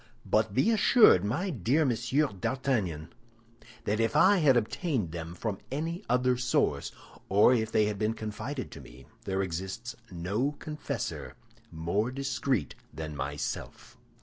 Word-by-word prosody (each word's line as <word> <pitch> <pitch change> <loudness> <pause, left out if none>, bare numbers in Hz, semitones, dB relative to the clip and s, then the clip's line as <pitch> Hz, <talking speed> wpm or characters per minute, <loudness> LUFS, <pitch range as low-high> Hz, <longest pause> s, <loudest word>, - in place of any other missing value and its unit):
But 110 -1 +1
be 170 - +4
assured, 215 - +6
my 155 - -1
dear 135 - +1
Monsieur 130 +4 +1
d'Artagnan, 100 - -2 0.7
that 105 +2 0
if 115 +5 +1
I 190 +7 +6
had 145 -7 +5
obtained 115 - -1
them 85 0 -6
from 105 0 -3
any 165 +7 -3
other 125 0 +2
source, 125 -1 0 0.4
or 105 +6 +6
if 110 -2 0
they 105 - +3
had 105 -1 -2
been 110 +1 0
confided 120 +6 -5
to - - -9
me, 65 +2 -14 0.2
there 95 0 0
exists 95 +7 -5
no 100 +11 -1
confessor 150 +1 -5 0.4
more 85 +8 -1
discreet 135 -2 -1 0.2
than 75 0 -6
myself." 70 +2 -5
115 Hz, 140 wpm, -29 LUFS, 95-135 Hz, 0.7 s, assured